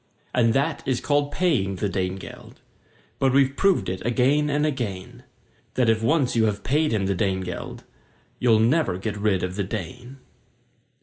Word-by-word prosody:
And 115 -2 +2
that 140 +2 0
is 130 -2 +1
called 145 0 0
paying 135 - 0
the 100 - -2
Dane 95 -1 -2
geld; 95 - -11 0.6
But 135 -1 +2
we've 135 0 +3
proved 195 +3 +2
it 95 0 -4
again 135 +6 +2
and 145 +1 +1
again, 115 -11 -4 0.5
That 120 -3 +3
if 110 0 0
once 135 +1 +1
you 115 -1 +3
have 105 -2 -2
paid 150 +3 +1
him 105 -3 0
the 100 - +1
Dane 95 -1 0
geld 90 -1 -7 0.6
You 115 -3 +4
never 120 - +2
get 105 +3 -4
rid 100 -3 0
of 90 +1 -3
the 100 - 0
Dane. 110 +6 -7
115 Hz, 175 wpm, -24 LUFS, 95-140 Hz, 0.6 s, You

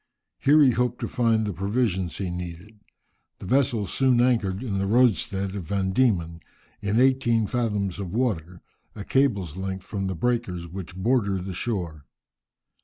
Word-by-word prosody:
Here 145 +3 +5
he 130 - +6
hoped 125 0 -1
to - - -1
find 115 -3 +1
the 105 - -2
provisions 95 -2 -1
he 95 -3 -3
needed. 90 +4 -7 0.6
The - - -10
vessels 120 -2 +1
soon 130 -3 +3
anchored 115 -5 +1
in 100 -6 -2
the 100 - 0
roadstead 105 -4 +2
of 100 -4 -5
Van 95 0 -1
Dieman, 90 -9 +1 0.4
in 105 +2 +1
eighteen 125 -4 +3
fathoms 105 -5 -1
of 95 -3 -5
water, 90 -7 -2 0.3
a 100 -2 -7
cable's 100 - +1
length 95 0 -4
from 95 -2 -3
the 95 - -3
breakers 95 -4 -1
which 90 0 -8
border 100 0 +1
the 95 +1 -5
shore. 85 -8 -4
100 Hz, 160 wpm, -25 LUFS, 95-120 Hz, 0.6 s, he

